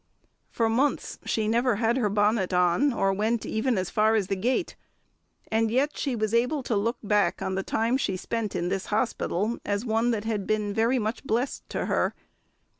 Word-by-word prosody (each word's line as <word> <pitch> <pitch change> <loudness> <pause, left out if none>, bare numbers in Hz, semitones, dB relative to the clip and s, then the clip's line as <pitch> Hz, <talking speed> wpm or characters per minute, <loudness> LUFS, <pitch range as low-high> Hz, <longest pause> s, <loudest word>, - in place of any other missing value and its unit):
For 230 - 0
months 255 +6 0
she 220 -1 0
never 235 +1 +2
had 225 +2 +1
her 225 -5 +1
bonnet 205 -1 +1
on, 180 +11 +3
or 195 -5 +1
went 215 +3 0
even 225 +1 0
as 185 -1 -2
far 220 +1 +3
as 210 -3 +2
the 195 - +1
gate; 250 - -1 0.8
and 225 0 +2
yet 270 +6 +1
she 270 -4 -2
was 215 -1 -1
able 250 +5 +1
to 235 - -1
look 225 +4 0
back 205 -4 +2
on 190 - -2
the 190 - -1
time 225 +5 0
she 190 -8 -1
spent 220 +2 -3
in 175 +1 -1
this 190 0 -2
hospital 215 -1 -1
as 205 +3 -2
one 225 +1 +1
that 220 -3 0
had 215 -3 -2
been 210 -1 0
very 230 +4 +2
much 220 +1 -2
blessed 250 +1 -2
to - - -2
her. - - 0
220 Hz, 195 wpm, -26 LUFS, 205-235 Hz, 0.8 s, on